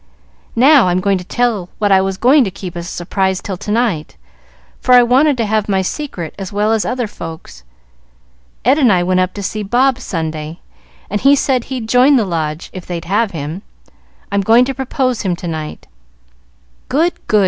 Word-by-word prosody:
Now 265 Hz, -1 st, +6 dB
I'll 180 Hz, 0 st, +1 dB, 0.2 s
tell 240 Hz, +7 st, 0 dB
you 180 Hz, -3 st, -7 dB
what 205 Hz, -1 st, +1 dB
I 190 Hz, -1 st, +5 dB
was 190 Hz, 0 st, -2 dB
going 265 Hz, +6 st, +5 dB
to 205 Hz, -, -1 dB
keep 185 Hz, -2 st, -8 dB
as 170 Hz, 0 st, -5 dB
a -, -, -6 dB
surprise 190 Hz, +1 st, -1 dB
till 195 Hz, -1 st, -5 dB
to 210 Hz, -, -8 dB
night, 210 Hz, -, -1 dB, 0.6 s
for 250 Hz, -, +2 dB
I 245 Hz, -, +7 dB
wanted 265 Hz, +4 st, +3 dB
to 230 Hz, -, 0 dB
have 215 Hz, 0 st, -1 dB
my 190 Hz, -1 st, +1 dB
secret 185 Hz, -, -5 dB
as 195 Hz, -2 st, -6 dB
well 210 Hz, +2 st, +1 dB
as 225 Hz, -2 st, +1 dB
other 250 Hz, -1 st, -1 dB
folks. 165 Hz, -, -9 dB, 1.0 s
Ed 265 Hz, +5 st, +4 dB
and 255 Hz, -7 st, +4 dB
I 180 Hz, -2 st, +3 dB
went 185 Hz, +1 st, +1 dB
up 185 Hz, 0 st, -1 dB
to 200 Hz, -, -5 dB
see 215 Hz, +3 st, -3 dB
Bob, 250 Hz, +5 st, +1 dB
Sunday, 160 Hz, -5 st, -5 dB, 0.5 s
and 205 Hz, +1 st, -3 dB
he 275 Hz, +2 st, +6 dB
said 260 Hz, -3 st, 0 dB
he'd 255 Hz, -4 st, -5 dB
join 250 Hz, +5 st, +5 dB
the 230 Hz, -5 st, +2 dB
Lodge, 160 Hz, -2 st, -3 dB
if 185 Hz, -2 st, -9 dB
they'd 175 Hz, -2 st, -5 dB
have 210 Hz, +4 st, +1 dB
him. 160 Hz, +1 st, -6 dB, 0.7 s
I'm 200 Hz, 0 st, +1 dB
going 230 Hz, +5 st, +5 dB
to 270 Hz, -, -3 dB
propose 255 Hz, -2 st, -1 dB
him 185 Hz, -3 st, -1 dB
to 175 Hz, -, -7 dB
night." 155 Hz, -2 st, -6 dB, 1.0 s
"Good! 325 Hz, +7 st, +2 dB
good!" 215 Hz, -, +3 dB
205 Hz, 195 wpm, -16 LUFS, 180-250 Hz, 1.0 s, I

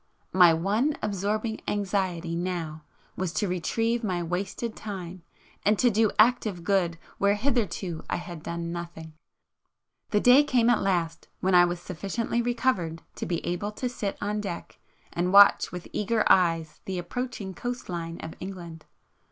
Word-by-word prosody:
My 180 Hz, -2 st, +7 dB
one 210 Hz, -, +1 dB
absorbing 210 Hz, +2 st, -1 dB
anxiety 190 Hz, -4 st, -1 dB
now 170 Hz, -3 st, -3 dB, 0.3 s
was 185 Hz, -3 st, -2 dB
to 205 Hz, -, 0 dB
retrieve 225 Hz, +6 st, 0 dB
my 180 Hz, -4 st, -1 dB
wasted 195 Hz, +6 st, -3 dB
time, 185 Hz, -4 st, -7 dB, 0.4 s
and 210 Hz, +1 st, +3 dB
to 245 Hz, +2 st, +4 dB
do 220 Hz, +1 st, +3 dB
active 215 Hz, -5 st, +3 dB
good 180 Hz, -3 st, +1 dB, 0.2 s
where 200 Hz, +1 st, +3 dB
hitherto 205 Hz, -, -1 dB
I -, -, 0 dB
had 175 Hz, -2 st, -7 dB
done 170 Hz, +1 st, -4 dB
nothing! 170 Hz, -2 st, -7 dB, 1.0 s
The 210 Hz, -, +3 dB
day 250 Hz, +6 st, +7 dB
came 245 Hz, -4 st, +3 dB
at 240 Hz, -, +2 dB
last, 170 Hz, -4 st, -1 dB
when 190 Hz, 0 st, +1 dB
I 175 Hz, 0 st, +8 dB
was 175 Hz, 0 st, -2 dB
sufficiently 200 Hz, +7 st, -2 dB
recovered 230 Hz, -9 st, 0 dB
to -, -, -4 dB
be 170 Hz, -1 st, -2 dB
able 180 Hz, +4 st, -2 dB
to 250 Hz, -, -3 dB
sit 210 Hz, -5 st, -4 dB
on 210 Hz, +1 st, -2 dB
deck 185 Hz, -5 st, -6 dB, 0.3 s
and 175 Hz, +1 st, 0 dB
watch 200 Hz, +1 st, +7 dB
with 180 Hz, -1 st, -7 dB
eager 215 Hz, +1 st, +1 dB
eyes 165 Hz, -4 st, +2 dB
the 190 Hz, -1 st, -3 dB
approaching 200 Hz, +2 st, -4 dB
coast 245 Hz, +5 st, -5 dB
line 170 Hz, -2 st, -5 dB
of 160 Hz, -, -7 dB
England. 175 Hz, -4 st, -8 dB
190 Hz, 155 wpm, -27 LUFS, 170-215 Hz, 1.0 s, I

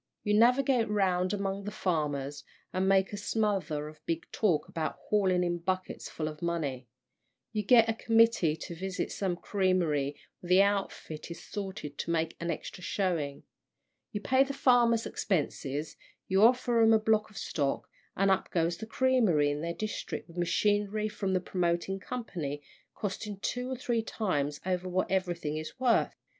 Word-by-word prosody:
You 210 Hz, -, +1 dB
navigate 245 Hz, +1 st, +4 dB
round 185 Hz, -3 st, +1 dB
among 200 Hz, -1 st, -2 dB
the -, -, -2 dB
farmers, 145 Hz, -7 st, -2 dB, 0.3 s
and 190 Hz, +1 st, +1 dB
make 195 Hz, +1 st, +3 dB
a -, -, -3 dB
smother 195 Hz, -9 st, -1 dB
of 155 Hz, 0 st, -13 dB
big 165 Hz, 0 st, -1 dB
talk 175 Hz, -9 st, +1 dB
about 160 Hz, -1 st, -3 dB
hauling 190 Hz, -4 st, +1 dB
in 175 Hz, -1 st, -1 dB
buckets 185 Hz, +2 st, -3 dB
full 155 Hz, -, -3 dB
of 155 Hz, 0 st, -7 dB
money. 145 Hz, -7 st, -2 dB, 0.6 s
You 215 Hz, -2 st, -1 dB
get 230 Hz, +2 st, +6 dB
a 225 Hz, -, +1 dB
committee 225 Hz, -8 st, +3 dB
to 170 Hz, -, -7 dB
visit 185 Hz, +2 st, -3 dB
some 190 Hz, -3 st, -1 dB
creamery 175 Hz, -8 st, 0 dB, 0.2 s
where 175 Hz, -, -10 dB
the 185 Hz, +2 st, +7 dB
outfit 195 Hz, -6 st, -2 dB
is 170 Hz, -, -8 dB
salted 190 Hz, -8 st, -6 dB
to -, -, -3 dB
make 165 Hz, -1 st, 0 dB
an 170 Hz, -, -3 dB
extra 170 Hz, +3 st, -5 dB
showing. 165 Hz, -9 st, -1 dB, 0.7 s
You 205 Hz, -, -4 dB
pay 260 Hz, +4 st, +4 dB
the 275 Hz, 0 st, -5 dB
farmers' 240 Hz, -4 st, +4 dB
expenses, 150 Hz, -4 st, -2 dB, 0.3 s
you 190 Hz, +1 st, +3 dB
offer 240 Hz, 0 st, +4 dB
'em 225 Hz, 0 st, +6 dB
a 220 Hz, -, +5 dB
block 215 Hz, 0 st, +2 dB
of 210 Hz, -, -14 dB
stock, 140 Hz, -3 st, -1 dB, 0.3 s
and 195 Hz, 0 st, +3 dB
up 190 Hz, -, +1 dB
goes 170 Hz, 0 st, 0 dB
the 220 Hz, -, -7 dB
creamery 220 Hz, -, +3 dB
in 145 Hz, +1 st, -3 dB
their 170 Hz, +1 st, -2 dB
district 215 Hz, 0 st, -4 dB
with 170 Hz, -, -15 dB
machinery 205 Hz, +4 st, +1 dB
from 205 Hz, -2 st, -2 dB
the 185 Hz, -, +3 dB
promoting 180 Hz, +1 st, -1 dB
company, 165 Hz, -, -5 dB, 0.3 s
costing 205 Hz, 0 st, -4 dB
two 250 Hz, +3 st, -2 dB
or 260 Hz, -, -2 dB
three 240 Hz, -3 st, 0 dB
times 150 Hz, -10 st, -1 dB
over 185 Hz, 0 st, -1 dB
what 185 Hz, +1 st, 0 dB
everything 175 Hz, -5 st, -1 dB
is 155 Hz, +10 st, -7 dB
worth. 250 Hz, -3 st, +2 dB
190 Hz, 170 wpm, -30 LUFS, 165-215 Hz, 0.7 s, the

